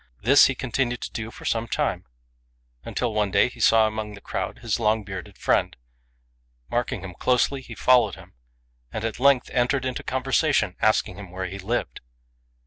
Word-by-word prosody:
This 135 +6 +7
he 135 - -2
continued 120 -1 -1
to - - -5
do 110 0 -5
for - - -12
some 115 0 0
time, - - -2 0.8
until 120 -3 -2
one 105 -1 +1
day 110 - +3
he 125 - -15
saw 110 0 +5
amongst 110 -1 -4
the 100 - -13
crowd - - -4
his - - -2
long 110 -1 +1
bearded 95 -4 -8
friend. - - +1 0.9
Marking 120 -5 -1
him 95 -2 -7
closely, 125 +7 +1
he - - -10
followed 120 -7 +4
him, - - -15 0.6
and 110 - -4
at 115 0 -4
length 135 -1 +3
entered 130 +2 +1
into 130 -1 -3
conversation, 130 0 +1
asking - - +2
him 100 -3 -9
where 95 +1 -5
he 95 +2 -6
lived. 115 +6 -3
115 Hz, 175 wpm, -24 LUFS, 105-125 Hz, 0.9 s, This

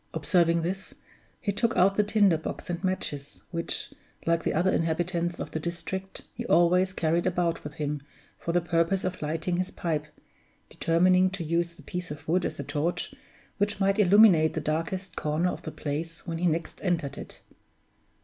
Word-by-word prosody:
Observing 170 +1 +3
this, 190 +3 -4 0.4
he 205 - -1
took 230 +3 0
out 190 +2 +5
the 210 - +3
tinder 205 -4 +4
box 165 - -5
and 175 +1 -4
matches, 145 -7 -3
which, 170 -1 -2 0.3
like 165 -1 +2
the - - +1
other 180 +4 +3
inhabitants 170 +1 0
of - - -5
the 160 - -2
district, 175 +3 -5
he 240 - -5
always 180 +1 +4
carried 170 0 +1
about 175 -2 0
with 150 0 -7
him 150 -2 -2 0.4
for 170 - -2
the 175 +1 +2
purpose 170 +3 +1
of 185 0 -3
lighting 160 +3 -1
his 185 +1 -1
pipe, 155 -3 -2 0.6
determining 180 +3 +4
to 190 -2 -5
use 170 +1 0
the - - -15
piece 180 0 -5
of 150 - -8
wood 175 +3 +2
as - - -4
a - - -2
torch 150 +5 -2 0.5
which 205 0 +1
might 195 +1 +2
illuminate 190 -5 +6
the - - 0
darkest 165 +5 -2
corner 155 +4 0
of - - -7
the 160 - -6
place 160 +3 -4
when 165 -2 -3
he 180 - +2
next 165 0 -2
entered 170 -7 0
it. - - -8
170 Hz, 180 wpm, -28 LUFS, 160-185 Hz, 0.6 s, illuminate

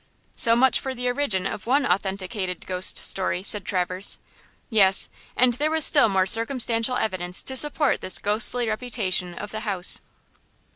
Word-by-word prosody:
"So 230 0 +2
much 260 +2 +3
for 265 -1 -6
the 250 0 -4
origin 245 -8 -2
of 200 - -6
one 275 +3 +1
authenticated 190 -1 -3
ghost 185 0 -1
story," 185 -1 0
said 205 0 -1
Traverse. 185 +1 -1 0.5
"Yes, 195 -5 +3 0.3
and 250 0 +3
there 295 +6 -2
was 315 -1 +3
still 285 -6 +4
more 190 -1 +1
circumstantial 230 +2 +2
evidence 180 -3 -1
to 265 - -3
support 295 +1 +2
this 185 - -1
ghostly 225 +3 +3
reputation 215 -6 -3
of 205 - -8
the 215 - -5
house. 195 -5 -2
215 Hz, 155 wpm, -23 LUFS, 185-250 Hz, 0.5 s, still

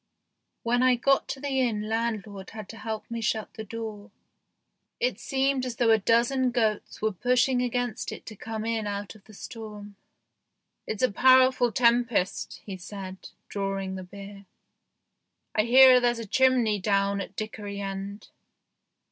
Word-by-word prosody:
When 245 +1 +2
I 255 -1 +5
got 275 +3 +2
to 270 - -5
the 275 -1 -1
inn 215 -4 -1
land 225 -1 -1
lord 200 -2 -10
had 215 -2 -8
to 225 - -9
help 220 0 -4
me 230 0 -3
shut 220 0 -2
the 220 - -7
door; 220 -1 -7 0.9
it - - 0
seemed 270 -1 0
as 250 -2 -3
though 230 -1 +3
a 220 - +5
dozen 240 +5 +2
goats 220 -4 -1
were 220 - +2
pushing 250 +5 +2
against 245 -2 -2
it - - -9
to 215 - -9
come 220 +1 -5
in 225 -2 -1
out 200 -1 -4
of 215 -2 -19
the 215 - -16
storm. 210 -2 -9 0.4
" - - -54
It's 220 - -3
a 255 - +4
powerful 255 +1 +5
tempest," 235 -4 +1
he 195 -2 -6
said, 190 0 -8 0.2
drawing 195 -1 -3
the 190 - -5
beer. 200 +1 -11 0.5
" - - -54
I 215 - +2
hear 255 +1 +8
there's 240 -1 +1
a 230 - -5
chimney 245 -2 +3
down 200 0 +1
at 195 0 -8
Dickory 205 -1 -5
End." 195 +1 -6
220 Hz, 165 wpm, -27 LUFS, 205-245 Hz, 0.9 s, hear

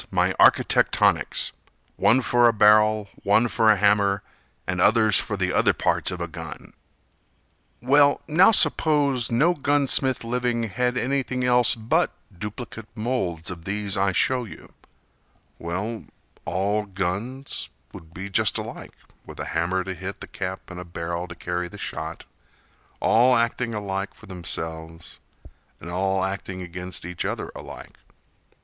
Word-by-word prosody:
My - - +1
architectonics - - +3 0.4
One 130 +3 +3
for 120 0 +4
a 115 - +3
barrel, 105 0 +4
one 110 +4 +3
for 110 +1 +2
a 110 - +7
hammer 100 -1 +2 0.4
And 90 -1 -2
others 110 -2 +4
for - - -4 0.2
other - - +3
parts - - 0
of 90 -2 -5
a 85 - -3
gun! 80 -1 -9 1.1
Well, 140 +2 +4
now 180 +7 +6
suppose 145 - +2
no 150 +10 +3
gun 145 -2 +1
smith 130 -2 +2
living 120 0 -1
Had 125 +4 -1
anything 130 0 -1
else 125 -1 +4
but 110 0 +1 0.3
duplicate 105 +3 -7
moulds 110 -8 -2
Of 85 -2 -9
these 100 0 -2
I 95 0 +2
show 125 +6 +1
you—well, 100 -2 -9 0.4
all 100 +5 0
guns 100 +8 -4 0.2
Would 80 0 -12
be 95 +3 -7
just 95 - +1
alike, - - -7 0.3
with - - -11
a - - -3
hammer 90 +3 0
to 95 +1 -5
hit 95 +2 -7
The - - -7
cap 95 -1 -6
and 90 - -8
a - - -6
barrel 85 0 -5
to 85 - -9
carry 90 +1 -3
the - - -11
shot - - -6 0.7
All 125 +3 +4
acting 115 0 0
alike 100 -1 -4
for - - -15
themselves, 80 -2 -5 0.6
and 85 - -8
all 95 +1 0
Acting 95 -1 -4
against 90 0 -6
each 90 0 -4
other - - -4
alike. - - -11
105 Hz, 140 wpm, -24 LUFS, 90-120 Hz, 1.1 s, a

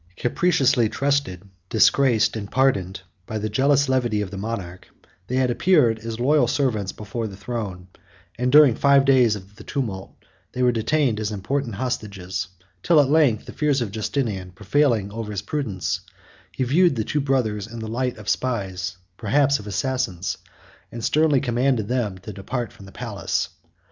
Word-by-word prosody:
Capriciously 130 -5 +2
trusted, 135 -10 -1 0.2
disgraced, 115 0 +3
and 100 -2 -5
pardoned, 100 -9 +1 0.3
by 110 - -3
the 110 0 -2
jealous 140 +5 +3
levity 125 -5 +1
of 100 -2 -4
the - - -6
monarch, 95 -4 -5 0.4
they 125 - -2
had 130 -1 +2
appeared 125 -7 +3
as 115 +1 -6
loyal 145 +4 +3
servants 110 -9 0
before 110 +2 -5
the 100 -2 -9
throne; 100 -4 -5 0.5
and, 125 +1 0
during 145 -3 +7
five 140 +2 +4
days 125 -5 +4
of 100 +1 -12
the - - -11
tumult, 110 -9 -4 0.4
they 125 - -1
were 125 - +5
detained 120 0 +1
as 105 -1 -2
important 115 +4 -2
hostages; 100 -5 -3 0.3
till 170 -3 +4
at 140 -1 +3
length, 145 -9 +3
the - - -9
fears 145 -2 +1
of 115 -5 -3
Justinian 105 -4 -2
prevailing 110 0 +1
over 110 0 -5
his 100 -2 -4
prudence, 105 -6 -2 0.5
he 130 - -2
viewed 165 +5 +3
the 110 - -1
two 150 +7 -1
brothers 120 -7 0
in 115 +1 -9
the 110 -1 -5
light 125 +2 -2
of 105 -2 -11
spies, 95 -7 -2 0.2
perhaps 140 +5 +2
of 105 - -10
assassins, 100 -4 -2 0.5
and 115 -1 -7
sternly 150 0 +3
commanded 125 -3 0
them 115 -6 -1
to 100 +3 -9
depart 115 +4 -4
from 100 - -14
the - - -12
palace. - - -3
115 Hz, 170 wpm, -23 LUFS, 100-135 Hz, 0.5 s, during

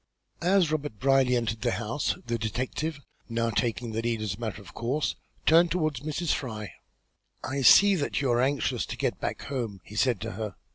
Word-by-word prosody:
As 180 -2 +3
Robert 145 -8 -2
Brierly 135 +2 +3
entered 115 -2 -1
the 120 -1 +1
house, 115 +6 -1
the 120 -1 -2
detective, 130 +8 -2 0.3
now 115 0 0
taking 115 +1 -1
the 110 +1 -2
lead 115 -1 -1
as 105 -4 -2
a 100 - -11
matter 110 -3 -4
of 100 - -13
course, 130 +6 -1 0.3
turned 170 +2 +6
toward 155 -6 0
Mrs. 155 +5 -1
Fry. 110 -6 -5 0.7
"I 135 +2 -2
see 200 +10 +8
that 150 -7 -1
you 135 -3 +1
are 120 0 +3
anxious 135 -1 0
to - - -5
get - - -1
back - - -3
home," 120 -8 -4
he 105 - -12
said 120 -1 +2
to - - -4
her. 105 0 -5
125 Hz, 195 wpm, -28 LUFS, 115-145 Hz, 0.7 s, see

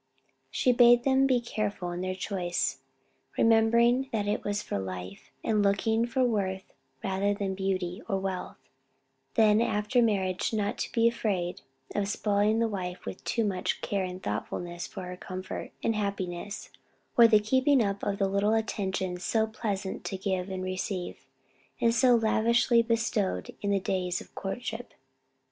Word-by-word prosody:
She 250 - +2
bade 240 0 +6
them 270 0 +4
be 255 -2 +3
careful 210 -6 -3
in 175 +1 -4
their 185 0 -2
choice, 185 -2 -2 0.6
remembering 235 +3 +4
that 210 -2 -1
it 205 - -1
was 205 0 -2
for - - -3
life, 95 0 -7
and 215 -2 +2
looking 220 +3 +2
for 260 +2 +1
worth 195 -5 -1 0.3
rather 195 +1 0
than 200 -1 -2
beauty 190 0 -2
or 195 - +1
wealth; 190 -1 -4 0.8
then 215 -1 +5
after 220 +2 +1
marriage 195 -4 +1
not 205 -1 -1
to - - -3
be 230 -1 +3
afraid 195 -7 -1 0.3
of 205 -1 0
spoiling 205 +1 +1
the 230 0 +2
wife 185 -4 -5
with - - -7
too 230 - 0
much 190 -3 -1
care 200 -2 -1
and 185 0 -6
thoughtfulness 175 +11 -4
for 190 - -7
her 180 0 -6
comfort, 185 +1 -6
and 225 - +1
happiness, 200 -1 -4 0.4
or 235 -1 +8
the 215 -2 +6
keeping 260 +4 +3
up 200 0 -2
of 200 -1 -1
the 195 - +2
little 200 +3 +2
attentions 190 -4 -2
so 220 -1 +2
pleasant 210 -3 -4
to 195 - -3
give 190 -1 -2
and 190 -1 -4
receive, 185 0 -4 0.5
and 230 0 +3
so 245 +1 +5
lavishly 230 +1 +3
bestowed 225 -4 -1
in 205 - -1
the 200 -1 +2
days 185 -1 -1
of - - -13
courtship. 230 +4 -5
205 Hz, 160 wpm, -28 LUFS, 185-225 Hz, 0.8 s, or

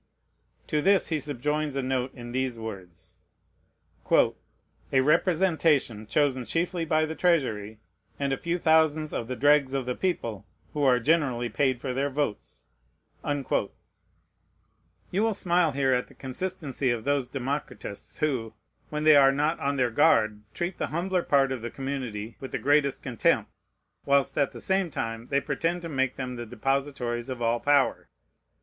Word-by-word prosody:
To 150 - 0
this 195 +3 +3
he 160 -2 0
subjoins 150 +1 -2
a 135 - -1
note 130 0 -1
in 120 -2 -8
these 130 -1 -1
words: 95 -6 -9 0.9
"A 135 - 0
representation 155 - +2
chosen 130 +1 +1
chiefly 170 +5 -1
by 155 0 +2
the 160 - -4
Treasury, 120 - 0 0.4
and 140 -1 0
a - - -1
few 170 +1 -2
thousands 160 -2 +3
of 115 - -3
the 130 - -3
dregs 145 +1 +3
of 135 -2 -1
the 125 - -1
people, 115 - -3 0.3
who 150 - -2
are 130 -3 +4
generally 130 -4 +1
paid 130 +2 +1
for 130 0 -3
their 140 +2 0
votes." 140 -6 -3 0.6
You 145 -1 -1 1.8
will 225 -1 +1
smile 175 -3 +2
here 135 -1 +2
at 125 0 0
the - - -18
consistency 140 -1 -3
of 120 -2 -1
those 140 -1 0
democratists 135 -5 -5
who, 130 -8 -1 0.3
when 150 0 -3
they 155 -1 +7
are 135 -1 +7
not 150 +4 0
on 140 +1 0
their 125 -3 +1
guard, 110 -1 +3
treat 175 +1 -3
the - - -1
humbler 180 +4 -1
part 135 -4 +2
of 130 -3 -3
the 120 - -4
community 125 -6 -5
with 135 - -7
the - - -1
greatest 140 +2 +2
contempt, 125 -4 +1 0.6
whilst, 140 -1 +3
at 140 -2 +1
the - - -10
same 190 -2 +1
time, 115 -4 -4
they 140 - +2
pretend 165 +5 -2
to 165 - -5
make 130 -3 0
them 125 -2 -5
the 120 -1 -6
depositories 135 -1 -2
of 130 -2 -4
all 120 0 +1
power. 145 0 +2
140 Hz, 160 wpm, -27 LUFS, 125-155 Hz, 1.8 s, they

